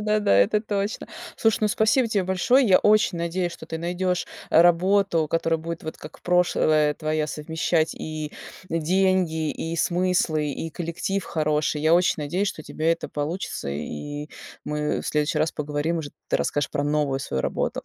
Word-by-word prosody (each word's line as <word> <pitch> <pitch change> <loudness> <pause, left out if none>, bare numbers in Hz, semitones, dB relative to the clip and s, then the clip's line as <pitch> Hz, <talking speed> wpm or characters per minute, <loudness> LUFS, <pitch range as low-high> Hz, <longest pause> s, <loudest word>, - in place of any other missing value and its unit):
да, 210 0 +1
да, 150 - +3
это 100 - +4
точно. 205 -1 -3 0.3
Слушай, 225 -1 +2
ну, 215 - +2
спасибо 225 +4 +2
тебе 200 -4 0
большое. 230 +8 +3
Я 185 - +6
очень 210 -4 +3
надеюсь, 175 +1 -1
что - - -10
ты 160 - -5
найдешь 180 +1 -1 0.2
работу, 175 0 +4
которая 165 0 +1
будет, 165 +1 -6
вот 155 - -5
как 155 - -12
прошлая 155 -4 +2
твоя, 155 -1 -1
совмещать 160 +2 -1
и 155 -1 -5 0.4
деньги, 165 -1 +1
и 165 +1 -4
смыслы, 175 -3 +1
и 165 +4 -4
коллектив 175 +4 -3
хороший. 150 -1 0
Я 160 +2 +4
очень 180 +1 +3
надеюсь, 175 +7 -1
что - - -6
у - - -23
тебя 160 +1 -1
это 165 - -1
получится, 150 - -4
и 145 - -5 0.4
мы 150 0 -1
в - - -8
следующий 150 +1 0
раз 155 +1 +1
поговорим, 150 +3 -2
уже 145 -3 -5 0.2
ты - - +2
расскажешь 145 - -1
про 145 - -1
новую 145 -2 0
свою 65 - -2
работу, - - -2
165 Hz, 170 wpm, -24 LUFS, 150-185 Hz, 0.4 s, Я